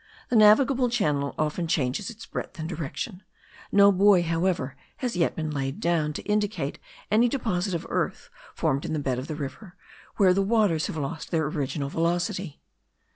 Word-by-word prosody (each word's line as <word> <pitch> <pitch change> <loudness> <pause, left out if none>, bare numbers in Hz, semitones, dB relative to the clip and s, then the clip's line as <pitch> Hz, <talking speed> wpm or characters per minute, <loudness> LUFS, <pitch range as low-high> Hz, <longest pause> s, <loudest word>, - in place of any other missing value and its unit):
The 245 - 0
navigable 245 +4 +5
channel 150 -12 0
often 155 +3 -1
changes 150 +4 0
its 225 -1 -10
breadth - - -6
and 160 -1 -4
direction; 175 +4 -5 0.5
no 200 0 +7
buoy, 195 -1 +5
however, 165 -5 -1 0.2
has 250 -7 -3
yet 170 -2 +1
been 155 -1 -3
laid 135 -1 -3
down, 165 -3 +1
to - - -6
indicate 210 -9 -1 0.3
any 230 +3 +4
deposit 200 -8 -1
of 165 - -4
earth - - -2 0.2
formed 140 +1 0
in - - -3
the - - 0
bed 130 -4 -1
of 130 - -6
the 155 - -4
river, 165 +6 -7 0.4
where 190 -3 +5
the 195 - +2
waters 195 -6 +2
have - - -5
lost 145 +1 -4
their 160 -3 +1
original 140 -1 -2
velocity. 175 +1 -1
175 Hz, 175 wpm, -26 LUFS, 150-205 Hz, 0.5 s, no